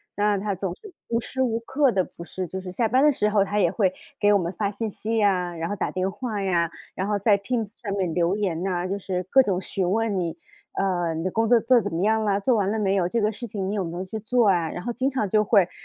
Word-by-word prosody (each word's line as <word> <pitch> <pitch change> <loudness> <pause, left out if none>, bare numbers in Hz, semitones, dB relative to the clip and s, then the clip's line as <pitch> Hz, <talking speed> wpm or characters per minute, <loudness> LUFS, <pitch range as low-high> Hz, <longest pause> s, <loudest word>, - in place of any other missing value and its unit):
那 205 0 +2
他 200 0 -2
总 190 -1 -4
是 390 - -14
无 230 0 0
时 260 +3 -4
无 230 -3 +1
刻 265 +2 +2
的 190 -2 +2
不 170 - -10
是 185 +1 -4
就 190 +2 -5
是 185 -1 -7
下 225 +2 +1
班 255 +3 +3
的 - - +7
时 210 -7 +1
候 205 -2 +3
他 205 +1 -2
也 180 -5 +3
会 190 -5 +1 0.3
给 205 0 +4
我 205 - +6
们 170 -1 -2
发 200 +2 -1
信 215 +2 -3
息 220 +3 -4
呀， 180 -5 +1
然 165 +1 -3
后 205 - -2
打 - - -1
电 185 +1 -1
话 210 0 -4
呀， 170 -4 +1 0.2
然 190 - -3
后 210 0 +1
在 200 0 +3
Teams 220 0 -3
上 200 -3 -3
面 185 -4 -1
留 175 +2 +1
言 185 -6 -1
呐， 180 -2 -1
就 200 +2 -2
是 185 -1 -3
各 265 - +7
种 195 -7 0
询 185 -1 -2
问 220 -2 +1
你， 170 -2 -3 0.4
呃， 175 -4 0
你 165 - -3
的 185 - -1
工 225 +3 +1
作 240 - +7
做 245 +2 +5
怎 205 -2 -4
么 165 - -1
样 220 +1 +2
了， 200 -1 +2
做 250 +6 +2
完 200 -2 +1
了 220 - -1
没 195 -1 +1
有？ 180 -3 +2
这 230 +5 0
个 215 +1 +2
事 240 +3 -7
情 195 -3 -3
你 205 - -2
有 200 - 0
没 165 +1 -5
有 185 - -3
去 220 +4 -5
做 225 -1 +3
呀？ 170 -3 +1
然 175 - -6
后 240 - -2
经 255 +3 0
常 255 -7 -1
就 215 +2 +4
会 195 -5 +4
200 Hz, 325 characters per minute, -24 LUFS, 185-220 Hz, 0.4 s, 的